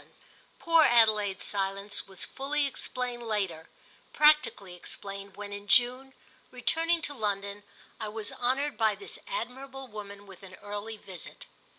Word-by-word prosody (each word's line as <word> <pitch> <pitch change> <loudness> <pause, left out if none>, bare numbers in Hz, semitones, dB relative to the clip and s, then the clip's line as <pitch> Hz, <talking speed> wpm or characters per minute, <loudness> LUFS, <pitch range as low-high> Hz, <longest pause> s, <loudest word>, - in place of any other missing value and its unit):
X - - -25 0.5
POOR 330 -1 +5
Adelaide's 215 -5 +4
silence 200 0 -1
was 190 -1 -3
fully 285 +2 -1
explained 250 -3 -3
later—practically 210 - +1
explained 195 +2 -6
when 205 0 -6
in 205 0 -7
June, 255 +4 +4 0.3
returning 330 +6 +2
to 290 - -1
London, 200 -4 -2 0.4
I 220 - -3
was 210 0 -3
honoured 270 +4 0
by 220 -2 +4
this 400 - -5
admirable 270 - -5
woman 205 -2 -9
with 195 -2 -13
an 185 -1 -11
early 205 +2 -6
visit. 190 -4 -10
215 Hz, 130 wpm, -29 LUFS, 200-265 Hz, 0.5 s, POOR